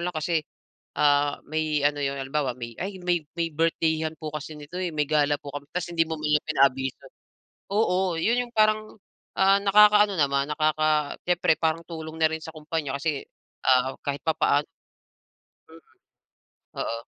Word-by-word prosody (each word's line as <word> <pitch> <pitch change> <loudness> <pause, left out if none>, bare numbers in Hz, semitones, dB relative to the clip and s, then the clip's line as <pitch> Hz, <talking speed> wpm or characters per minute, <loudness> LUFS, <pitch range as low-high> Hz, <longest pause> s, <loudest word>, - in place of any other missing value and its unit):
lang 175 -1 -3
kasi 160 +1 0 0.6
ah, 145 -1 +3
may 155 -1 -1
ano 145 0 +1
'yon 140 0 -1
halimbawa 135 0 -1
may 120 -1 -7
ay 195 +1 -4
may 175 -1 +2 0.2
may 165 -1 0
birthday-an 160 0 0
po 155 0 -7
kasi 150 0 -6
nito 150 +5 -7
may 155 -5 -1
gala 145 -1 +2
po 140 - -10
kami 145 0 -7
ta's 175 -1 -3
hindi 165 -1 +3
mo 160 - -3
man 155 -1 -2
lang - - -61
pinaabiso, 135 -2 +1 0.7
oo 185 -5 +1
'yon 245 +6 +2
'yong 240 - -15
parang, 215 0 +2 0.4
ah 195 +1 +5
nakaka-ano 210 0 +6
naman, 140 -1 +1
nakaka 155 -1 +1
siyempre 175 -2 +2
parang 160 0 0
tulong 160 -1 -7
na 160 - +5
rin 160 - -3
sa 160 - -8
kumpanya 155 -3 -3
kasi 150 -2 -2 0.4
ah, 130 0 +3
kahit 140 -1 -2
papaano 150 -2 +2 1.0
Mm. 165 +1 -15 1.0
Oo. 115 0 -3
155 Hz, 160 wpm, -25 LUFS, 145-170 Hz, 1.0 s, nakaka-ano